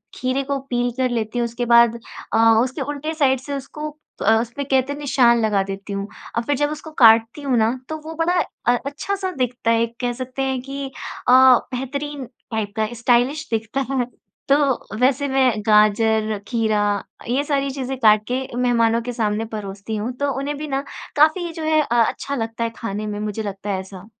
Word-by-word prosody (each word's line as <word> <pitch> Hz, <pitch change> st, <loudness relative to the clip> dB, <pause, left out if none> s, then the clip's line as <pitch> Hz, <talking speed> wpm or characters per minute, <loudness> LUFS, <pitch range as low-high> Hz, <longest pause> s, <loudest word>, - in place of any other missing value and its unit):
खीरे 255 Hz, +2 st, -1 dB
को 280 Hz, +1 st, -2 dB
पील 245 Hz, 0 st, 0 dB
कर 255 Hz, -1 st, +1 dB
लेती 230 Hz, 0 st, -2 dB
हूँ 235 Hz, -, +1 dB
उसके 235 Hz, +1 st, -3 dB
बाद 235 Hz, 0 st, +5 dB, 0.3 s
अ, -, -, +3 dB, 0.3 s
उसके 260 Hz, +3 st, -4 dB
उलटे 290 Hz, +3 st, -3 dB
साइड 270 Hz, -5 st, +2 dB
से 280 Hz, +2 st, -6 dB
उसको 300 Hz, +3 st, -6 dB, 0.4 s
अ, 220 Hz, +2 st, +5 dB
उसपे 240 Hz, +4 st, -5 dB
कहते 270 Hz, 0 st, +1 dB
निशान 250 Hz, -5 st, +3 dB
लगा 200 Hz, -2 st, +2 dB
देती 195 Hz, +1 st, -6 dB
हूँ 200 Hz, 0 st, -3 dB, 0.3 s
और 235 Hz, -, +1 dB
फिर 285 Hz, +5 st, 0 dB
जब 290 Hz, +1 st, +1 dB
उसको 305 Hz, +1 st, -7 dB
काटती 225 Hz, +4 st, +6 dB
हूँ 270 Hz, -3 st, +1 dB
ना 225 Hz, +3 st, +1 dB
तो 315 Hz, -, -3 dB
वो 320 Hz, -, -6 dB
बड़ा 345 Hz, +2 st, +1 dB, 0.3 s
अ 245 Hz, -, +5 dB
अच्छा-सा 375 Hz, +7 st, -3 dB
दिखता 245 Hz, -2 st, 0 dB
है 230 Hz, 0 st, +3 dB
एक 230 Hz, 0 st, -5 dB
कह 245 Hz, 0 st, 0 dB
सकते 255 Hz, +1 st, -6 dB
हैं 265 Hz, -1 st, -1 dB
कि 275 Hz, +1 st, -6 dB, 0.4 s
अ, -, -, +5 dB
बेहतरीन 260 Hz, +2 st, +3 dB
टाइप 220 Hz, -4 st, -6 dB
का 215 Hz, -1 st, +1 dB
स्टाइलिश 245 Hz, +6 st, +1 dB
दिखता 225 Hz, +4 st, -1 dB
है। 255 Hz, -2 st, +1 dB, 0.4 s
तो 275 Hz, -, +6 dB, 0.4 s
वैसे 270 Hz, +3 st, +2 dB
मैं 265 Hz, -1 st, +3 dB, 0.2 s
गाजर, 215 Hz, 0 st, +3 dB
खीरा 220 Hz, -3 st, +1 dB, 0.5 s
ये 265 Hz, +4 st, +1 dB
सारी 280 Hz, -1 st, 0 dB
चीज़ें 265 Hz, -1 st, -4 dB
काट 215 Hz, -3 st, +5 dB
के 255 Hz, -, +1 dB, 0.2 s
मेहमानों 235 Hz, -2 st, +2 dB
के 245 Hz, -, -4 dB
सामने 220 Hz, -1 st, -1 dB
परोसती 205 Hz, 0 st, -5 dB
हूँ। 215 Hz, +4 st, -2 dB
तो 285 Hz, 0 st, 0 dB
उन्हें 285 Hz, +1 st, -3 dB
भी 305 Hz, +1 st, -5 dB
ना 275 Hz, -1 st, -1 dB, 0.3 s
काफ़ी 315 Hz, +3 st, +3 dB
जो 320 Hz, -, -6 dB
है 310 Hz, 0 st, +3 dB
अ 240 Hz, -4 st, +2 dB
अच्छा 280 Hz, -, -4 dB
लगता 225 Hz, -1 st, -3 dB
है 230 Hz, -, 0 dB
खाने 215 Hz, -1 st, -4 dB
में, 205 Hz, 0 st, -4 dB
मुझे 210 Hz, +1 st, -3 dB
लगता 200 Hz, 0 st, -6 dB
है 190 Hz, -2 st, 0 dB
ऐसा। 190 Hz, 0 st, -10 dB
245 Hz, 195 wpm, -21 LUFS, 225-280 Hz, 0.5 s, काटती